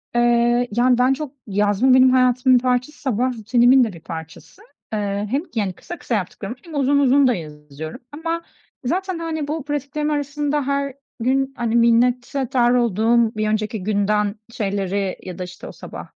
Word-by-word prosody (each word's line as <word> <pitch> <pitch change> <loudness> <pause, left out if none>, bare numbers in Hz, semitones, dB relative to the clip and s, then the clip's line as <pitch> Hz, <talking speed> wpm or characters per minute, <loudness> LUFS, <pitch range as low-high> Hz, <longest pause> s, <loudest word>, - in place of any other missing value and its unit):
Eee, 240 0 +3
yani, 245 +3 +3
ben 250 +2 +4
çok 290 -1 -5 0.2
yazma, 205 +5 +2
benim 260 0 +7
hayatımın 255 0 +4
bir - - -15
parçası, 250 +3 -1
sabah 255 -1 0
rutinimin 245 +4 +4
de 220 -5 -2
bir 165 - -11
parçası. 160 - -9 0.3
Eee, 205 -1 -1
hem, 275 - +1
yani, 200 -4 -1
kısa 345 - -9
kısa 235 - -2
yaptıklarımı 205 +3 -4
hem 330 -3 -9
uzun 280 0 +2
uzun 275 0 +4
da 250 - +3
yazıyorum 150 - -8
ama 330 +3 -3 0.4
zaten, 370 +5 -1
hani, 320 -3 -3
bu 305 0 -3
pratiklerim 295 +1 -2
arasında 290 -1 -1
her 280 -1 -1 0.3
gün, 265 +3 0
hani, 235 -1 -1
minnettar 245 +1 +2
olduğum 230 0 +2
bir 215 0 -1
önceki 215 -1 -2
günden 205 +1 +1 0.2
şeyleri 195 -3 -2
ya 185 -1 -7
da, - - -2
işte, 180 0 -10
o - - -8
sabah - - -9
245 Hz, 165 wpm, -21 LUFS, 210-275 Hz, 0.4 s, benim